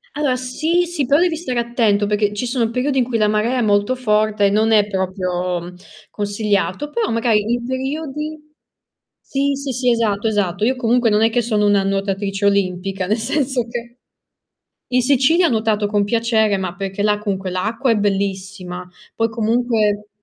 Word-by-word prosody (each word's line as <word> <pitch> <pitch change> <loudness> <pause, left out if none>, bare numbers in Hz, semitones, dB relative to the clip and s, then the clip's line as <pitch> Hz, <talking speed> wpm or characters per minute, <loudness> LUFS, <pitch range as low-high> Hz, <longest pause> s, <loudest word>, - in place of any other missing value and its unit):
Allora, 285 -4 +1
sì, 315 +8 0
sì, 335 -5 -2
però 285 +2 +4
devi 345 -2 +2
stare 285 -7 -4
attento, 230 -4 +1
perché 210 0 +1
ci 210 +4 -3
sono 240 -2 0
periodi 260 +3 0
in 250 - +4
cui 235 -1 -2
la 215 - +2
marea 215 +4 +1
è - - +1
molto 205 +4 +2
forte 215 -3 +1
e - - +4
non 220 +2 +2
è 210 -2 +5
proprio, 185 -2 -2
mhmm, 175 +1 -10 0.4
consigliato, 205 +4 -1
però 460 +3 -1
magari 230 -2 +2
in 240 0 -1
periodi 300 +4 -4 0.8
sì, 280 +1 -1
sì, 275 -1 -4
sì, 250 0 +1
esatto, 225 -2 0
esatto. 205 -3 -1
Io 260 - +2
comunque 245 -1 +2
non 210 +1 +3
è 225 - +4
che 245 - +2
sono 215 -3 0
una 205 -1 +3
nuotatrice 195 +1 -1
olimpica, 190 -1 0
nel 215 +3 +1
senso 260 0 -1
che 235 0 -7 0.9
in 250 0 +3
Sicilia 285 +7 +3
ho - - 0
nuotato 215 -2 +1
con 205 -1 +1
piacere, 220 -1 +1
ma 185 -2 -4
perché 195 0 -4
là 210 0 +2
comunque 195 -3 -3
l'acqua 225 +8 -1
è 225 - +3
bellissima, 195 -2 -3 0.3
poi 225 0 +1
comunque 220 -2 0
220 Hz, 180 wpm, -19 LUFS, 200-250 Hz, 0.9 s, è